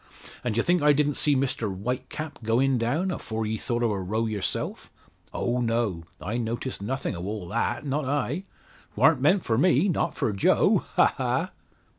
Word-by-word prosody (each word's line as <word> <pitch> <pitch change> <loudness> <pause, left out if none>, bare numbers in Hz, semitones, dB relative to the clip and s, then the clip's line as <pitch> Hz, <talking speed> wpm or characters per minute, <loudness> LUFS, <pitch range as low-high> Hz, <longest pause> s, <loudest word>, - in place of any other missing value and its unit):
And 120 -4 -1
d'ye 115 - +2
think 175 0 +2
I 150 0 +6
didn't 145 0 +2
see 145 +1 +2
Mr 130 -6 0
Whitecap 125 - -5
going 120 +3 +2
down, 155 +12 0
afore 110 -9 -3
ye 110 +1 -1
thought 120 -1 -1
o' 115 - +2
a 100 - -1
row 110 +5 -1
yerself. 105 -4 -3 0.4
Oh, 120 +1 -1
no; 115 -8 0
I 110 +5 -3
noticed 120 0 -3
nothin' 130 +1 -2
o' 85 - -6
all 100 -2 -4
that, 115 - -1
not 145 +1 -1
I? 145 +6 -1 0.5
'Twarn't 135 +4 +4
meant 180 +7 +3
for 115 0 +1
me 175 +1 +4
not 170 - 0
for 105 - 0
Joe 100 - +3
ha, - - +5
ha!" - - 0
120 Hz, 180 wpm, -26 LUFS, 110-145 Hz, 0.5 s, I